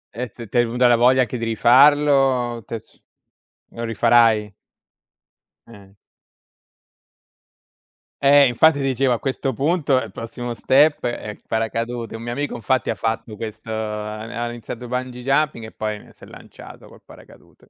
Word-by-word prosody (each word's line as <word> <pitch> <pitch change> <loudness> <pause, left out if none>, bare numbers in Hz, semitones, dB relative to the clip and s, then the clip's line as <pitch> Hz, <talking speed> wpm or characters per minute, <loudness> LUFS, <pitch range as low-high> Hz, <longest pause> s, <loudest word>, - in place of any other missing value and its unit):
Eh 125 +1 -4
t 115 +1 -10
t'è 120 +3 +2
venuta 125 +2 +2
la 120 - +5
voglia 125 +2 +4
anche 125 0 -2
di 115 - -3
rifarlo, 130 0 +3
t'è 115 - -4
s 110 - -19 0.7
lo 115 - -8
rifarai? 115 -2 +3 1.1
Eh. 100 -4 -16 2.3
Eh, 140 0 +6
infatti, 145 +5 +3
dicevo, 135 -1 0
a 120 - -2
questo 135 0 -2
punto 145 +1 +1
il - - -8
prossimo 120 +1 -6
step 145 +5 +2
è 120 -3 -4
il 105 - -14
paracadute. 115 +1 -3
Un 115 - -8
mio 120 +1 -5
amico, 145 +4 -3
infatti, 130 +1 -1
ha - - 0
fatto 115 -1 -3
questo 110 +1 -8
ha 105 -1 -4 0.3
ha - - -4
iniziato 120 +1 -8
bungee 125 0 -4
jumping 135 -3 0
e 110 - -10
poi 105 -1 -5
si - - -21
è - - -11
lanciato - - -14
col - - -17
paracadute. - - -19
120 Hz, 155 wpm, -21 LUFS, 115-130 Hz, 2.3 s, Eh